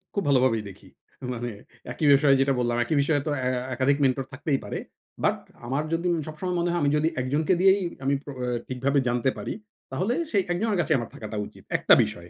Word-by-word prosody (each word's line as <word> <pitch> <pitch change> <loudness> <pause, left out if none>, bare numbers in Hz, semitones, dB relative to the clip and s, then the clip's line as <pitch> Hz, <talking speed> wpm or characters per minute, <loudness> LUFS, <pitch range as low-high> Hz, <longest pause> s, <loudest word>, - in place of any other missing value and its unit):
খুব 200 - 0
ভালোভাবেই 130 -5 +3
দেখি। 95 - -14 0.5
মানে 120 0 -4 0.4
একই 155 - -2
বিষয় 140 0 +5
যেটা 135 0 +3
বললাম, 120 -1 +1
একই 155 - -1
বিষয়ে 145 0 +1
তো - - +1 0.2
এ - - +2 0.2
একাধিক 130 +3 +2
মেন্টর 135 0 +2
থাকতেই 140 +1 -1
পারে। - - -4 0.4
বাট - - +3 0.3
আমার 140 +4 0
যদি 170 +2 0 0.2
সবসময় 165 +4 -3
মনে 175 0 +1
হয় 175 - 0
আমি 145 - +3
যদি 155 +1 +2
১ - - -3
জনকে 155 +5 +2
দিয়েই 195 +1 +5 0.2
আমি 140 - +2
আ 145 0 -8 0.3
ঠিকভাবে 135 +2 +1
জানতে 120 +2 +1
পারি, - - -4 0.4
তাহলে 200 +7 0 0.2
সেই 200 - +3
১ 175 - +1
জনের 220 -4 +1
কাছে - - +1
আমার 120 -2 -4
থাকাটা 110 -1 -6
উচিত। - - -17
একটা - - +5
বিষয়ে। 85 0 -6
140 Hz, 205 wpm, -26 LUFS, 125-165 Hz, 0.5 s, বিষয়